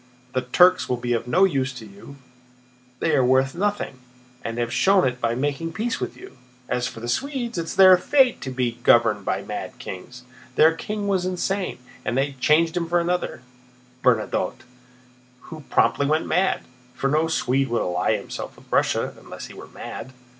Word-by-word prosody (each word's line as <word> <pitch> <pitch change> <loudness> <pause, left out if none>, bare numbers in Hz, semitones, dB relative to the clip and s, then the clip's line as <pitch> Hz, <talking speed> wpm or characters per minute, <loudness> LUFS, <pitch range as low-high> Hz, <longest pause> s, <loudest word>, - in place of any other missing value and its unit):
The 130 - +1
Turks 180 +9 +4
will 125 - 0
be 120 0 -1
of 115 - -2
no 180 +9 +3
use 135 -8 +2
to 120 -3 -9
you; 100 +7 -13 0.8
they 160 - +1
are 130 - +4
worth 130 +1 +3
nothing 200 -7 -2 0.4
and 115 0 -4
have 120 0 -2
shown 190 -7 +4
it 125 0 -4
by 115 0 +1
making 145 +5 -2
peace 225 +2 -2
with - - -5
you. - - -13 0.3
As 125 0 -1
for 115 - -9
the 120 - -5
Swedes—it 240 - -2
is 165 - -6
their 185 -1 +9
fate 265 +5 +3
to 135 - -4
be 125 -2 -2
governed 115 -4 +4
by - - -1
mad - - -6
kings. 125 +7 -9 0.3
Their 160 +1 +6
king 205 +5 -4
was 185 -2 +1
insane 185 +1 -2 0.3
and 115 - -1
they 140 +1 +1
changed 160 +5 +3
him 170 -1 -1
for 175 0 +3
another—Bernadotte, 125 -8 -2 0.8
who 155 -1 -10
promptly 140 - +2
went 155 +2 +1
mad—for 125 -8 -2
no 155 +3 +2
Swede 135 -3 +1
would 120 -1 0
ally 90 0 0
himself - - -7
with - - -20
Russia - - +1
unless - - -9
he - - -11
were - - -11
mad." 130 - -8
135 Hz, 175 wpm, -23 LUFS, 125-180 Hz, 0.8 s, their